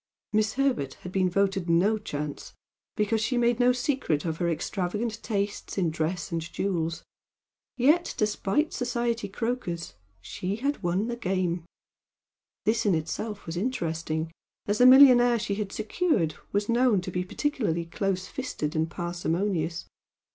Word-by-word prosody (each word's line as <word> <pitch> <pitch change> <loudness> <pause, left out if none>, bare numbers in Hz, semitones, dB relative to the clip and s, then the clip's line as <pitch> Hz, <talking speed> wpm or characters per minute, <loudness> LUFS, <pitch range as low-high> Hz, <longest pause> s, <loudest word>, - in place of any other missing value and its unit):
Miss 215 0 +2
Herbert 250 - 0
had 180 - -5
been 185 -1 +2
voted 195 -1 0
"no 195 +6 +3
chance," 150 -7 -5 0.4
because 215 +1 +1
she 230 +3 0
made 240 0 +2
no 245 0 +5
secret 250 - 0
of 160 -2 -2
her 170 0 0
extravagant 205 +7 -2
tastes 205 -2 -3
in 175 -4 +1
dress 160 +3 -2
and 165 -1 -1
jewels, 165 -1 -2 0.7
yet 300 +8 +3
despite 215 +7 0
society 235 -3 -1
croakers 200 -5 -3 0.3
she 180 - -4
had 280 +6 -2
won 180 +3 0
the 240 0 -3
game. 185 -6 -1 1.0
This 220 +1 +2
in 190 - +4
itself 200 +7 -4
was 165 - -5
interesting, 165 -6 -2 0.3
as 205 +1 0
the 250 - +8
millionaire 250 -2 +8
she 210 -2 -2
had 200 -1 -3
secured 215 - 0 0.2
was 205 +1 0
known 235 -3 +3
to 185 - -6
be 180 0 -1
particularly 195 - -1
close 185 +2 -2
fisted 180 - -4
and 160 +1 +1
parsimonious. 175 0 -2
200 Hz, 145 wpm, -27 LUFS, 170-235 Hz, 1.0 s, the